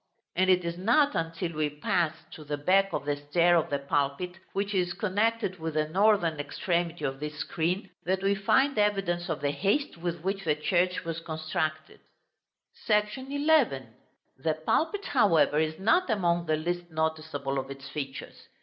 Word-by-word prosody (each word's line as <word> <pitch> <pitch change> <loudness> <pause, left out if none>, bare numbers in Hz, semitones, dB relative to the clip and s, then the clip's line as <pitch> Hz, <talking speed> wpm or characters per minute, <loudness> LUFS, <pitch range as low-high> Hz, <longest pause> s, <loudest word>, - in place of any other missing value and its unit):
And 185 +1 +2
it 180 -1 +4
is 170 +1 -3
not 265 +9 +3
until 165 +1 -2
we 155 -1 0
pass 155 +2 0 0.2
to 155 - -10
the 145 0 -3
back 195 +6 +3
of - - -3
the 145 0 0
stair 170 +4 +3
of 165 - +1
the 140 - 0
pulpit, 140 +6 -2
which 200 +1 -2
is 180 -2 +1
connected 210 0 0
with 160 -1 -4
the 155 0 +1
northern 185 -4 +3
extremity 170 +3 -2
of 135 0 -3
this 150 +1 -5
screen, 175 +5 -2
that 190 +2 -1
we 195 0 +3
find 240 +6 +2
evidence 195 -4 0
of 160 - -2
the 145 - +1
haste 200 - 0
with 170 -1 -4
which 195 +2 -2
the 155 -4 +1
church 180 +4 0
was 165 0 -3
constructed. 155 -1 -3 0.9
§ 210 -1 +6
XI. 270 - +1 0.5
The 155 +2 +1
pulpit, 320 - 0
however, 165 - +3
is 155 0 0
not 265 - +2
among 175 -5 +1
the 155 - +2
least 175 +2 -3
noticeable 155 -4 -2
of 135 0 -6
its 135 -1 -8
features. 135 -1 -7
170 Hz, 170 wpm, -28 LUFS, 155-195 Hz, 0.9 s, §